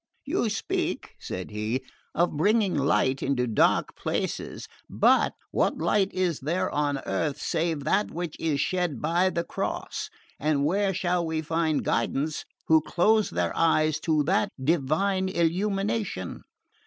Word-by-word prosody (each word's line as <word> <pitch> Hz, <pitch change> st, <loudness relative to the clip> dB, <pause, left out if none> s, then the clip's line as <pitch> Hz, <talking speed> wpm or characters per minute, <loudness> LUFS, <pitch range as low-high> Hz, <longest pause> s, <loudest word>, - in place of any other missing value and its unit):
"You -, -, 0 dB
speak," -, -, -2 dB
said 95 Hz, +3 st, -6 dB
he, 110 Hz, +5 st, -2 dB, 0.3 s
"of 175 Hz, -1 st, +1 dB
bringing 205 Hz, +5 st, +2 dB
light 135 Hz, -1 st, +2 dB
into 135 Hz, -2 st, +1 dB
dark 115 Hz, -3 st, +2 dB
places; -, -, -3 dB, 0.2 s
but -, -, +3 dB, 0.2 s
what -, -, +1 dB
light 195 Hz, +4 st, +1 dB
is 180 Hz, -4 st, 0 dB
there 165 Hz, +7 st, -1 dB
on 145 Hz, -1 st, 0 dB
earth 150 Hz, -2 st, -1 dB
save 160 Hz, -3 st, -1 dB
that 195 Hz, +8 st, +1 dB
which 170 Hz, -1 st, -5 dB
is 155 Hz, -3 st, 0 dB
shed 175 Hz, 0 st, 0 dB
by 175 Hz, +4 st, +2 dB
the 170 Hz, -2 st, -1 dB
Cross, -, -, -4 dB, 0.3 s
and 145 Hz, -1 st, +1 dB
where 195 Hz, +5 st, +2 dB
shall 175 Hz, -2 st, 0 dB
they 160 Hz, -1 st, -1 dB
find 160 Hz, -1 st, 0 dB
guidance 140 Hz, +6 st, -1 dB, 0.2 s
who 160 Hz, -1 st, +6 dB
close 215 Hz, +7 st, +2 dB
their -, -, -1 dB
eyes 155 Hz, -2 st, +2 dB
to 155 Hz, -2 st, +1 dB
that 195 Hz, +6 st, +1 dB
divine 175 Hz, +6 st, +1 dB
illumination?" 195 Hz, -, -1 dB
165 Hz, 140 wpm, -27 LUFS, 145-185 Hz, 0.3 s, who